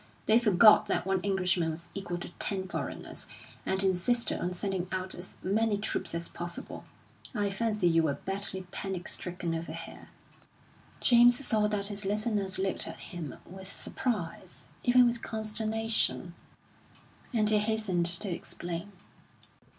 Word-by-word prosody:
They 220 +2 +5
forgot 215 -1 +6
that - - 0
one 190 -1 +1
Englishman 185 -4 +1
was 160 +2 -7
equal 195 -3 -4
to - - -6
ten 190 -2 +2
foreigners, - - -5 0.4
and 190 +1 +3
insisted 205 +5 +1
on 180 - -2
sending 185 0 -2
out 185 0 -2
as 180 +1 -9
many 210 +2 +1
troops 205 -4 -2
as 170 0 -3
possible. 175 0 -6 0.5
I 205 -2 0
fancy 210 -2 0
you 165 -1 +4
were 150 -3 0
badly 195 -1 -4
panic 190 -3 -3
stricken 175 -2 -4
over 165 0 -4
here." - - -8 0.9
James 240 0 +6
saw 215 -2 +3
that 205 -1 0
his 205 +1 -3
listeners 205 -1 0
looked 190 0 -1
at - - -8
him 165 -6 -5
with 190 +1 -8
surprise, 185 -7 -3 0.2
even 250 0 +6
with 235 -1 +1
consternation; 220 -4 +1 1.0
and 220 -4 +2
he 210 - +5
hastened 210 -5 +1
to 175 +4 +2
explain. 175 +3 -5
195 Hz, 145 wpm, -30 LUFS, 180-215 Hz, 1.0 s, forgot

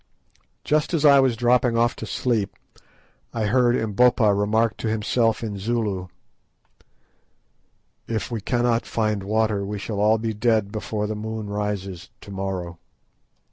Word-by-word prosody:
Just 155 +3 +1
as 155 -2 +1
I 140 -1 +8
was 130 -3 +3
dropping 120 0 +2
off 120 +1 +2
to - - -6
sleep 115 -6 -1 0.8
I 110 -2 0
heard 120 +2 +3
Umbopa 110 0 +3
remark 105 +2 +1
to - - -4
himself 110 +1 +1
in 105 -3 -4
Zulu— 105 -4 -2 2.0
"If 115 +1 -3
we 115 -3 -3
cannot 120 +1 0
find 110 -3 -1
water 105 0 0
we 105 +1 -4
shall 100 +1 -4
all 105 +2 +4
be 110 0 -2
dead 110 -2 +1
before 105 -1 -3
the 105 - -2
moon 110 -1 -5
rises 100 -4 -4
to 100 - -11
morrow." 95 -3 -4
110 Hz, 140 wpm, -23 LUFS, 100-120 Hz, 2.0 s, I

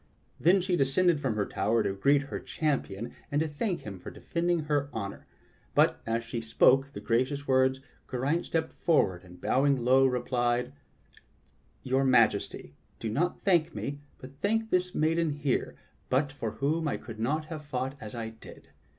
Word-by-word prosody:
Then 185 +4 +5
she 180 0 +1
descended 165 +3 +3
from 130 -6 -1
her 105 -1 0
tower 110 +4 +1
to - - -1
greet 140 +8 +3
her 145 - -5
champion 130 - -2 0.2
and 150 +3 +1
thank 180 +5 -2
him 100 -3 -8
for - - -8
defending 170 0 -1
her 145 -2 0
honor. 100 -3 -6 0.5
But - - +3
as 115 +1 0
she 115 0 -4
spoke 130 +4 +4
the - - -6
gracious 130 +5 0
words, 130 0 +3 0.3
Geraint 140 +7 -1
stepped 160 -1 -1
forward 95 - +1
and 90 -1 -14
bowing 135 -2 +2
low, 135 +1 +6
replied: 125 0 0 1.1
"Your 130 +1 +1
Majesty, 115 - +2 0.3
do 115 - -3
not 175 +10 -1
thank 170 -5 +2
me, 145 0 -4 0.2
but 135 +2 -13
thank 220 +2 0
this 180 0 +1
maiden 165 +1 +2
here, 145 -3 -1 0.3
but 140 +3 +1
for 130 -6 -4
whom 155 +3 0
I - - -1
could 110 -2 -10
not 150 +7 0
have 155 -1 -7
fought 130 -2 -3
as 110 +2 -7
I 115 -1 -4
did. 110 - -14
135 Hz, 170 wpm, -29 LUFS, 115-155 Hz, 1.1 s, low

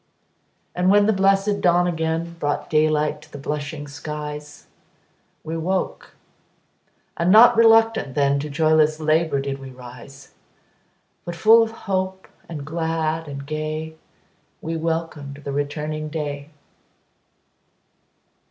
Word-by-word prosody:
And 180 +1 +1
when 205 +1 +5
the 220 - +3
blessed 195 +1 +2
dawn 175 0 +4
again 165 0 -2
Brought 145 - -2
daylight 155 -1 +2
to 155 0 -18
the - - -8
blushing 145 +1 -5
skies, 150 0 -7 0.8
We 160 +1 -5
woke, 180 +3 -3 1.0
and 170 +1 +1
not 235 +3 +8
RELUCTANT 225 - +4
then, 140 -1 +2
To 150 +2 -5
joyless 155 0 +2
LABOUR 155 -2 +1
did 140 0 -4
we 135 -1 -9
rise; 125 +2 -13 0.9
But 175 - -6
full 220 +6 +6
of 225 - +1 0.2
hope, 190 -1 -2 0.2
and 150 -4 -6
glad 160 0 -2
and 140 -1 -7
gay, 155 +1 -4 0.7
We 165 +1 -4
welcomed 160 -3 -3
the 140 - -4
returning 150 +2 -3
day. 145 -2 -5
155 Hz, 120 wpm, -22 LUFS, 145-170 Hz, 1.0 s, not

